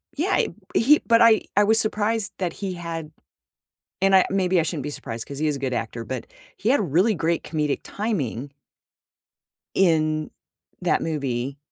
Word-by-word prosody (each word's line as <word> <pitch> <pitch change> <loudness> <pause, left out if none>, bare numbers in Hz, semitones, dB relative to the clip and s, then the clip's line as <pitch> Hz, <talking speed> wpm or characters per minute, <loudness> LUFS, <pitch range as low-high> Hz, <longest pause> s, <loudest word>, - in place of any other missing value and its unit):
Yeah, 355 +7 -1
i - - +2 0.3
he 295 +6 +5
but 230 -1 +4
I 225 -3 +6
I 205 - +5
was 220 +2 +5
surprised 215 0 +1
that 180 -2 -2
he 195 -2 -4
had 165 -3 -6 0.9
and 195 0 +3
I 190 - +7
maybe 185 -2 +2
I - - +2
shouldn't 155 -3 -3
be 150 - -3
surprised 115 -5 -6
'cause 140 0 -7
he 155 - 0
is 150 -2 0
a - - -6
good 130 -1 -3
actor, 115 0 -4
but 130 -1 -5 0.3
he 220 - 0
had 280 - +4
really 200 +6 +3
great 165 0 0
comedic 150 -2 -1
timing 145 - -3 1.3
in 155 -4 +2 0.5
that - - +1
movie. 140 -4 -3
165 Hz, 175 wpm, -23 LUFS, 145-205 Hz, 1.3 s, I